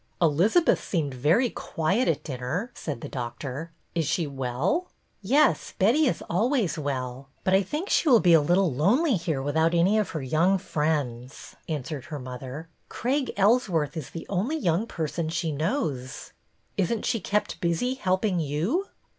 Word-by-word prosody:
'' -, -, -41 dB
Elizabeth 180 Hz, -, +3 dB
seemed 150 Hz, -7 st, -1 dB
very 160 Hz, -, +2 dB
quiet 190 Hz, +10 st, -1 dB
at -, -, 0 dB
dinner," 140 Hz, -, -3 dB
said 140 Hz, -7 st, -5 dB
the -, -, -5 dB
doctor. 130 Hz, +5 st, -5 dB
'' -, -, -43 dB
Is 165 Hz, -4 st, 0 dB
she 170 Hz, +1 st, +1 dB
well? 140 Hz, -, -1 dB
" -, -, -43 dB
'' -, -, -43 dB
Yes, 265 Hz, +10 st, +2 dB
Betty 255 Hz, +11 st, +4 dB
is -, -, -1 dB
always 220 Hz, -, +1 dB
well, 135 Hz, -2 st, -4 dB, 0.2 s
but 185 Hz, -, +1 dB
I 190 Hz, -, +5 dB
think 300 Hz, -, -4 dB
she 325 Hz, -, +2 dB
will 240 Hz, -4 st, +7 dB
be 175 Hz, -4 st, +5 dB
a 160 Hz, -, +7 dB
little 175 Hz, +1 st, +2 dB
lonely 235 Hz, -, +3 dB
here 160 Hz, -6 st, -2 dB
without 160 Hz, +4 st, +2 dB
any 190 Hz, +6 st, +4 dB
of 210 Hz, -, -1 dB
her 155 Hz, -5 st, -4 dB
young 165 Hz, +8 st, +3 dB
friends," 145 Hz, -8 st, -3 dB
answered 150 Hz, -2 st, -4 dB
her 150 Hz, -, -6 dB
mother. 130 Hz, +4 st, -7 dB, 0.2 s
Craig 265 Hz, +3 st, -1 dB
Ellsworth 195 Hz, -, +2 dB
is 155 Hz, -5 st, -5 dB
the 165 Hz, -, -7 dB
only 210 Hz, -, -1 dB
young 185 Hz, -, 0 dB
person 160 Hz, -2 st, -3 dB
she 165 Hz, 0 st, -1 dB
knows." 150 Hz, -, -3 dB, 0.2 s
'' -, -, -42 dB
Is 195 Hz, 0 st, +1 dB
n't 230 Hz, -, -2 dB
she 230 Hz, -, +1 dB
kept 210 Hz, +2 st, -1 dB
busy 170 Hz, +9 st, 0 dB
helping 190 Hz, -5 st, 0 dB
you? 170 Hz, -, -1 dB
170 Hz, 180 wpm, -26 LUFS, 145-210 Hz, 0.2 s, will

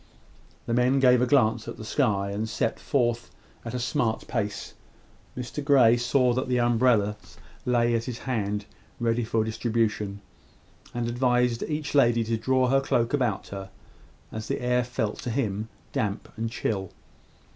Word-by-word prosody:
The 115 Hz, -, -2 dB
men 125 Hz, +3 st, +3 dB
gave 125 Hz, -2 st, +5 dB
a 125 Hz, -, +2 dB
glance 115 Hz, -4 st, +3 dB
at -, -, -6 dB
the 110 Hz, -, -8 dB
sky, 100 Hz, -6 st, +1 dB
and 110 Hz, +2 st, -3 dB
set 115 Hz, -, -1 dB
forth 120 Hz, -3 st, 0 dB, 0.3 s
at 120 Hz, +1 st, -5 dB
a -, -, -1 dB
smart 120 Hz, -2 st, -1 dB
pace. 105 Hz, -4 st, -3 dB, 0.6 s
Mr 125 Hz, +4 st, -4 dB
Grey 130 Hz, -5 st, +6 dB
saw 125 Hz, +1 st, +2 dB
that 130 Hz, +2 st, -1 dB
the 125 Hz, -1 st, +1 dB
umbrellas 115 Hz, -3 st, +1 dB, 0.3 s
lay 120 Hz, -1 st, +3 dB
at 115 Hz, 0 st, 0 dB
his 125 Hz, -3 st, -4 dB
hand, 105 Hz, -5 st, -2 dB, 0.3 s
ready 120 Hz, 0 st, +1 dB
for 110 Hz, 0 st, +1 dB
distribution, 110 Hz, -3 st, -1 dB, 0.7 s
and 120 Hz, -1 st, -2 dB
advised 125 Hz, -1 st, +1 dB
each 150 Hz, -1 st, -3 dB
lady 120 Hz, -5 st, +4 dB
to 115 Hz, +1 st, -1 dB
draw 130 Hz, +3 st, +2 dB
her 135 Hz, +1 st, +4 dB
cloak 120 Hz, -2 st, 0 dB
about 125 Hz, -8 st, 0 dB
her, 95 Hz, -1 st, -7 dB, 0.6 s
as 110 Hz, 0 st, -6 dB
the -, -, -2 dB
air 125 Hz, 0 st, +1 dB
felt 120 Hz, -3 st, -3 dB
to -, -, -4 dB
him 110 Hz, -3 st, -2 dB, 0.2 s
damp 105 Hz, -6 st, -2 dB
and 115 Hz, 0 st, -2 dB
chill. 95 Hz, -4 st, -2 dB
120 Hz, 160 wpm, -26 LUFS, 110-125 Hz, 0.7 s, Grey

